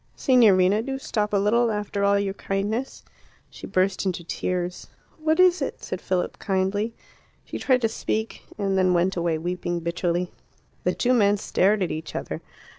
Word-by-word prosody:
"Signorina, 210 Hz, -6 st, +4 dB
do 270 Hz, +3 st, -3 dB
stop 210 Hz, -5 st, -2 dB
a 205 Hz, -, +2 dB
little 230 Hz, +4 st, +3 dB
after 210 Hz, -1 st, -2 dB
all 200 Hz, 0 st, +4 dB
your 200 Hz, -1 st, -1 dB
kindness." 205 Hz, +7 st, -3 dB, 0.5 s
She -, -, -9 dB
burst 185 Hz, +1 st, +1 dB
into 180 Hz, -3 st, -2 dB
tears. 180 Hz, +1 st, -3 dB, 0.3 s
"What 315 Hz, +2 st, +1 dB
is 365 Hz, -2 st, +5 dB
it?" 275 Hz, -, -4 dB
said -, -, -5 dB
Philip 185 Hz, -1 st, -2 dB
kindly. 200 Hz, +4 st, -1 dB, 0.5 s
She -, -, -6 dB
tried 255 Hz, -2 st, +2 dB
to -, -, +5 dB
speak, 220 Hz, 0 st, -3 dB, 0.2 s
and 195 Hz, -2 st, 0 dB
then 185 Hz, -1 st, +3 dB
went 180 Hz, +2 st, +2 dB
away 170 Hz, -2 st, 0 dB
weeping 175 Hz, +1 st, -3 dB
bitterly. 175 Hz, +1 st, -1 dB, 0.5 s
The -, -, +1 dB
two 250 Hz, +1 st, +2 dB
men 205 Hz, -4 st, +4 dB
stared 200 Hz, +1 st, +2 dB
at 175 Hz, -, -2 dB
each 155 Hz, 0 st, -6 dB
other. -, -, -4 dB
200 Hz, 170 wpm, -24 LUFS, 180-220 Hz, 0.5 s, is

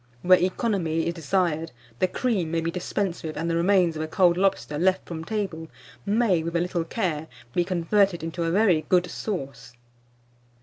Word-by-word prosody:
Where 185 Hz, 0 st, +6 dB
economy 180 Hz, -4 st, 0 dB
is 170 Hz, -, -1 dB
desired, 165 Hz, -1 st, -1 dB, 0.3 s
the 185 Hz, -, +3 dB
cream 195 Hz, -5 st, -1 dB
may 165 Hz, +1 st, 0 dB
be 165 Hz, +1 st, -2 dB
dispensed 180 Hz, 0 st, -3 dB
with, 155 Hz, -1 st, -5 dB
and 165 Hz, +2 st, -2 dB
the 165 Hz, -, 0 dB
remains 175 Hz, -1 st, +3 dB
of 155 Hz, -, -3 dB
a 155 Hz, -, -2 dB
cold 175 Hz, +1 st, +3 dB
lobster 185 Hz, -5 st, 0 dB
left 190 Hz, +2 st, +2 dB
from 160 Hz, -2 st, -5 dB
table, 190 Hz, -5 st, -3 dB, 0.4 s
may, 205 Hz, -5 st, +2 dB
with 170 Hz, +1 st, -4 dB
a -, -, +3 dB
little 175 Hz, -1 st, -1 dB
care, 165 Hz, -6 st, -2 dB, 0.3 s
be 175 Hz, -, +2 dB
converted 185 Hz, +1 st, +1 dB
into 165 Hz, +1 st, -4 dB
a 165 Hz, -, 0 dB
very 180 Hz, -4 st, +3 dB
good 180 Hz, -1 st, +4 dB
sauce. 140 Hz, -, -5 dB
175 Hz, 180 wpm, -25 LUFS, 165-190 Hz, 0.4 s, Where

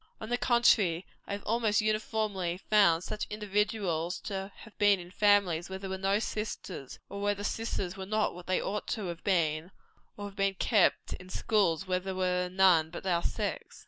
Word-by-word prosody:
On 220 Hz, -, -7 dB
the 245 Hz, -, +1 dB
contrary, 205 Hz, -8 st, +3 dB, 0.2 s
I -, -, -3 dB
have 200 Hz, -, -5 dB
almost 225 Hz, -1 st, +2 dB
uniformly 215 Hz, -4 st, -1 dB
found 195 Hz, -4 st, +3 dB
such 210 Hz, +1 st, -4 dB
individuals 205 Hz, -5 st, -1 dB
to 195 Hz, -1 st, -5 dB
have 220 Hz, -, -14 dB
been 205 Hz, -2 st, +5 dB
in 175 Hz, 0 st, -10 dB
families 195 Hz, -5 st, +3 dB
where 190 Hz, -, -4 dB
there 190 Hz, 0 st, -6 dB
were 190 Hz, -, -2 dB
no 195 Hz, +1 st, +2 dB
sisters, 210 Hz, -, -5 dB
or 200 Hz, 0 st, -7 dB
where 205 Hz, 0 st, +1 dB
the 200 Hz, -, -7 dB
sisters 205 Hz, -5 st, -2 dB
were 190 Hz, -1 st, -7 dB
not 215 Hz, +1 st, +1 dB
what 180 Hz, 0 st, -11 dB
they 185 Hz, -, +2 dB
ought 210 Hz, +1 st, -3 dB
to 210 Hz, -, -4 dB
have 170 Hz, 0 st, -7 dB
been; 160 Hz, -5 st, +1 dB, 0.5 s
or 205 Hz, -, -7 dB
to 205 Hz, -, -4 dB
have 195 Hz, -, -17 dB
been 195 Hz, -1 st, +1 dB
kept 210 Hz, 0 st, +2 dB
at 185 Hz, 0 st, -13 dB
schools 195 Hz, -4 st, +1 dB
where 185 Hz, -1 st, 0 dB
there 190 Hz, 0 st, -5 dB
were 180 Hz, -1 st, 0 dB
none 180 Hz, -4 st, +4 dB
but 175 Hz, -, -8 dB
our 175 Hz, -2 st, +2 dB
sex. -, -, -3 dB
195 Hz, 200 wpm, -30 LUFS, 180-210 Hz, 0.5 s, been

